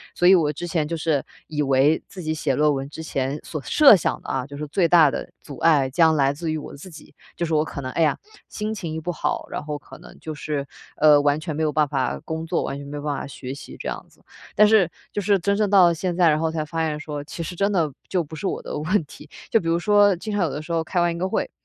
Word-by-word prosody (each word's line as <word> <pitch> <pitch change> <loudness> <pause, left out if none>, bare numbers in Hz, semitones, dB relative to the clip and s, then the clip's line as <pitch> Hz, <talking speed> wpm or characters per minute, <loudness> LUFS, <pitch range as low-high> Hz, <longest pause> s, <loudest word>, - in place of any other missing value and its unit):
所 175 - +3
以 190 - +8
我 155 -4 +2
之 150 +4 -6
前 160 -3 -1
就 165 - -3
是 155 -3 0 0.2
以 150 -1 -2
为 140 +3 +3
自 185 - -9
己 155 - -1
写 150 -3 -1
论 150 +1 +3
文 135 0 -4
之 160 +2 -8
前 140 -1 -2
所 155 -3 -6
设 285 -7 +7
想 175 - -1
的 - - -8
啊， 130 -1 -1
就 140 0 -9
是 150 - -4
最 170 +3 +2
大 160 -4 +6
的 - - -5
阻 140 - -9
碍 145 -5 +3
将 160 +3 +4
来 140 -2 +2
自 160 +2 -4
于 155 - -1
我 150 - -8
自 150 +7 -11
己， 160 - -14 0.2
就 170 - -2
是 165 - -3
我 155 0 +3
可 160 - -7
能 130 -1 -5
哎 165 - -1
呀， 155 - +3 0.3
心 215 0 -4
情 175 -7 -5
一 160 - -3
不 175 +3 -3
好， 150 -2 -2
然 - - -4
后 150 0 -4
可 145 - -14
能 - - -14
就 155 - -6
是 145 -2 -3 0.3
呃， 150 -1 +6
完 145 +1 +2
全 155 -1 -5
没 160 - -2
有 155 - +1
办 150 0 +2
法 135 -3 -1
工 160 0 -4
作、 165 - -1
完 140 - -4
全 140 0 -9
没 145 - -6
有 145 - -7
办 150 -1 -1
法 - - -5
学 130 -1 -7
习 140 - -10
这 - - -6
样 - - -4
子。 - - -26 0.3
但 210 - +7
是 210 -5 +4 0.2
就 205 - -2
是 200 0 +3
真 200 +3 0
正 210 -1 +1
到 190 -3 +7
了 170 - +4
现 175 +2 -2
在， 175 -2 +4
然 155 0 +2
后 160 0 0
才 160 -1 -2
发 160 +1 -2
现 150 -1 -3
说 150 -2 -6
其 165 +2 -6
实 165 - -6
真 200 +3 +1
的 165 -7 +1 0.2
就 180 -3 0
不 160 +1 -10
是 180 +6 -3
我 - - -3
的 - - -6
问 170 +5 +1
题。 - - -14 0.2
就 225 - +5
比 165 - -6
如 165 +1 +2
说 205 +1 +4
经 210 +5 -6
常 205 -2 +1
有 160 - -1
的 150 - -5
时 160 - -9
候 165 -1 +1
开 175 +2 -2
完 175 0 +2
一 - - -6
个 185 - 0
会， - - -2
155 Hz, 320 characters per minute, -23 LUFS, 145-175 Hz, 0.3 s, 以